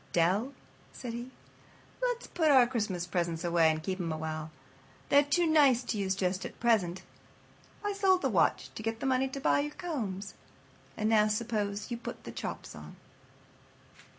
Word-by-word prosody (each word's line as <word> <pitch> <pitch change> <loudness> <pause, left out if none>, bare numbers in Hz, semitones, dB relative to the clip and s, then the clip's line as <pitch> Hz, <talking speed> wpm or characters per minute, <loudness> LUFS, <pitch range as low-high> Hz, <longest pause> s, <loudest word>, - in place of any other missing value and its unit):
"Dell," 190 +10 +2 0.4
said 240 -3 -7
he, 240 +2 -6 0.7
"let's - - -1
put 320 -3 +1
our 260 -4 +7
Christmas 210 -8 -2
presents 170 -2 -2
away 170 -2 +4
and 155 0 -1
keep 190 +1 -3
'em 170 -2 -2
a 155 - -2
while. 155 0 -4 0.6
They're 285 - +7
too 295 +5 +1
nice 285 -6 +5
to 220 - -3
use 190 -1 0
just 185 0 -1
at - - -8
present. 200 -7 +1 0.8
I 410 - 0
sold 380 -2 +3
the - - +3
watch - - +1
to - - -7
get 225 +1 -3
the - - -4
money 265 0 +2
to 270 +1 -6
buy 270 - +3
your 295 +1 -3
combs. 215 - -4 0.6
And 215 - 0
now 215 -1 +4
suppose 210 -1 -2
you 235 - -2
put 235 - -8
the - - -7
chops - - -6
on." - - -11
220 Hz, 180 wpm, -30 LUFS, 185-270 Hz, 0.8 s, our